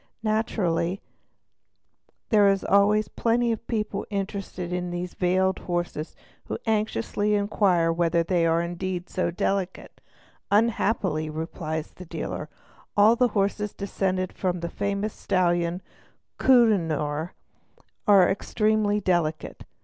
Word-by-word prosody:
Naturally 195 -5 0 1.3
there 205 -3 +5
are 195 - +2
always 210 +2 +4
plenty 235 +1 +1
of 225 0 -4
people 210 -3 -2
interested 195 -3 -4
in 180 0 -2
these 175 0 -4
veiled 185 +1 +1
horses 175 -3 -3 0.3
who - - -4
anxiously 210 - 0
inquire 200 -5 +2
whether 170 0 +2
they 170 -1 +1
are 165 +1 +2
indeed 180 +1 -4
so 185 - 0
delicate; 185 +2 -3 0.5
"unhappily", 200 -7 +1
replies 160 0 -4
the 185 - -11
dealer, 155 -2 -5 0.5
''all 215 +3 +6
the 250 +1 +3
horses 205 +1 0
descended 190 -2 -2
from 180 -2 -2
the 170 - -3
famous 200 +3 -2
stallion 175 -1 0 0.6
Kohinoor 165 - +2 0.7
are 195 -3 +7
extremely 210 +1 +1
delicate'"'. 170 -5 -1
185 Hz, 110 wpm, -25 LUFS, 170-210 Hz, 1.3 s, are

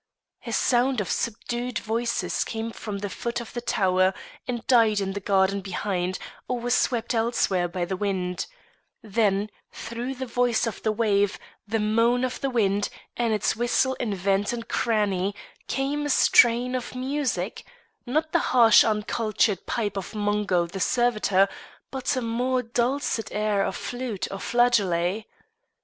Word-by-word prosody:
A - - -3
sound 250 0 +2
of 200 - -2
subdued 240 +2 -2
voices 235 +2 -1
came 225 0 -4
from 210 -2 -6
the 205 0 -4
foot 235 +5 -3
of 235 - -9
the 240 - -3
tower 185 -4 +2 0.3
and 240 -2 -3
died 225 -4 +4
in 195 -1 -2
the 200 - -3
garden 195 0 +2
behind 185 -1 -2 0.3
or 250 -1 -1
was 245 0 0
swept 235 -1 +1
elsewhere 225 -6 +1
by 175 0 -3
the 190 - -3
wind; 185 -2 -2 0.6
then, 210 -1 +1 0.2
through 240 +3 -5
the 260 +1 -4
voice 245 -1 +1
of 230 - -4
the 220 - +1
wave, 205 -2 +1 0.3
the 225 +2 0
moan 230 +3 +2
of 255 -1 -2
the 275 - 0
wind, 205 -4 +1 0.3
and 235 -2 0
its 215 0 +1
whistle 240 +3 +1
in 215 -5 -1
vent 195 +2 +1
and 230 -1 -5
cranny, 205 -4 0 0.3
came 280 +3 -1
a - - -4
strain 245 -1 +5
of 255 0 -4
music 255 -7 -2 0.4
not 310 +5 -1
the 340 - +3 0.2
harsh 230 -2 +8
uncultured 215 -2 0
pipe 210 -4 -1
of 195 +2 -5
Mungo 205 -4 +1
the 175 +3 -7
servitor, 215 -3 +2 0.4
but 265 -1 -1
a 255 - -1
more 250 +3 0
dulcet 235 -1 -1
air 210 -1 +1
of 190 - -2
flute 245 -5 -4
or 195 - -5
flageolet. 210 -5 +2
225 Hz, 155 wpm, -25 LUFS, 200-245 Hz, 0.6 s, harsh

